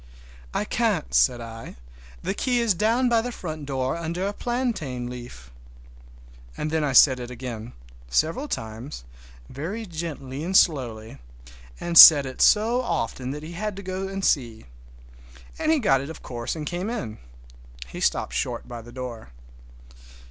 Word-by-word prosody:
"I - - -1
can't," 60 - -1
said - - +3
I. 115 -1 -9 0.5
"The - - -1
key 245 +3 0
is 230 -3 +2
down 225 +7 +2
by 235 -2 +3
the 245 +2 -4
front 155 - -7
door 130 0 -1
under 170 +2 -3
a 200 - -2
plantain 210 - -3
leaf!" 120 - -10 1.1
And 155 - -3
then 160 -1 0
I 145 - 0
said 130 0 +6
it 120 -1 -6
again, 120 -2 -7 0.4
several 165 - 0
times, 115 - -6 0.4
very 185 - -5
gently 155 -6 -6
and 190 +3 +3
slowly, 115 - +1 0.6
and 170 -1 +4
said 145 -3 +11
it 130 -1 -6
so 230 +4 +4
often 130 - -3
that 150 +2 -5
he 160 - -8
had 205 +3 -4
to 200 - -8
go 190 +1 -4
and 195 0 -3
see, 120 -6 0 0.9
and 310 - +1
he 320 - +4
got 140 - +2
it, 140 - -7
of 160 - -10
course, 120 +2 -4
and 155 -2 -5
came 180 +6 -3
in. 115 - -5 0.7
He - - -9
stopped - - 0
short - - -3
by 120 -1 -7
the 120 +1 -13
door. 120 - -7
150 Hz, 165 wpm, -24 LUFS, 120-195 Hz, 1.1 s, said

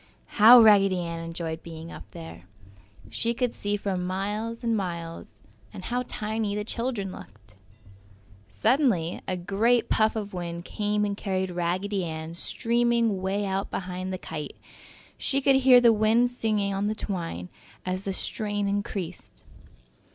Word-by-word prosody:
How 240 +3 +11
Raggedy 200 -4 +6
Ann 170 -1 -4
enjoyed 165 -1 -5
being 165 0 -9
up - - -11
there! 85 -1 -10 0.7
She 230 - -1
could 250 -1 0
see 205 0 -2
for 200 -1 -2
miles 205 +6 -3
and 230 -1 +1
miles! 170 -4 -5 0.3
And - - -9
how 250 +1 -2
tiny 215 -1 -2
the 210 - -2
children 230 -3 -3
looked! 105 - -13 1.0
Suddenly 180 - +1
a 185 - -1
great 210 +7 +1
puff 220 0 +3
of 205 -2 -4
wind 170 -1 -5
came 210 0 0
and 200 -1 -2
carried 190 -2 -2
Raggedy 185 +3 -1
Ann 160 -1 -5
streaming 235 +1 +1
'way 195 +2 -1
out 195 0 -2
behind 185 0 -4
the 185 - -3
kite! 155 -4 -7 0.6
She 275 - 0
could 270 0 +4
hear 260 -2 +7
the 235 -2 +6
wind 225 +3 +3
singing 215 -4 0
on 195 +1 -1
the 215 - -1
twine 165 - -4 0.4
as 185 +1 -2
the 195 - -2
strain 205 0 -2
increased. 200 -3 -4
200 Hz, 150 wpm, -26 LUFS, 175-220 Hz, 1.0 s, How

